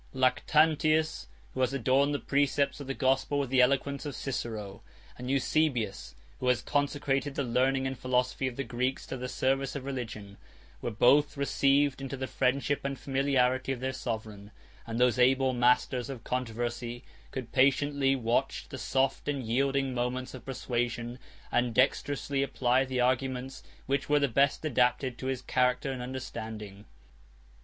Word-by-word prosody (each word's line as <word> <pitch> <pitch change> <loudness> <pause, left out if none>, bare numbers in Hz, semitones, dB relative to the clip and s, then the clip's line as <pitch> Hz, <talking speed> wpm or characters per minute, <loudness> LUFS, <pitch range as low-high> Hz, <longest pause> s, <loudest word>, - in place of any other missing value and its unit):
56 130 - -8
Lactantius, 155 +4 +2 0.3
who - - -6
has 130 +1 +1
adorned 135 +2 +2
the 145 - 0
precepts 140 +1 +1
of 140 - -7
the 135 - -3
gospel 135 +1 +1
with 140 -3 -1
the 130 -1 +5
eloquence 140 +2 +1
of 145 -2 -5
Cicero, 110 -7 -5 0.3
57 - - -24
and 125 +1 -5
Eusebius, 130 - 0 0.2
who 130 - -2
has 125 -1 +2
consecrated 145 -1 0
the 140 - 0
learning 130 +2 +1
and 130 0 -2
philosophy 125 +1 0
of 125 - -5
the 140 - -2
Greeks 125 +2 -2
to - - -5
the 125 0 -5
service 135 +2 0
of 135 -2 -5
religion, 110 -7 -6 0.4
58 - - -28
were - - -2
both 140 +7 +4
received 140 0 +2
into 135 0 -5
the 130 - -3
friendship 135 +2 0
and 140 0 -3
familiarity 130 -1 +1
of 130 - -3
their 130 +1 -2
sovereign; 110 -5 -5 0.4
and 115 +1 -3
those 125 -1 +3
able 130 +1 +4
masters 125 +1 +2
of 130 -4 -7
controversy 120 0 -3 0.3
could 130 -3 -6
patiently 135 +1 +3
watch 125 +2 0
the 130 - -7
soft 135 +1 0
and 140 -3 -1
yielding 135 +3 0
moments 125 +1 -2
of 130 -3 -9
persuasion, 120 -2 -3 0.3
and 120 -1 +1
dexterously 140 +1 +1
apply 130 -1 +2
the 130 -1 -3
arguments 130 +1 0 0.2
which 140 +1 -1
were 150 0 +4
the 140 - +2
best 140 +5 +2
adapted 125 -2 +1
to 130 - -4
his 130 -2 -2
character 125 +1 +1
and 130 -2 -5
understanding. 110 -5 -7
130 Hz, 165 wpm, -29 LUFS, 125-140 Hz, 0.4 s, the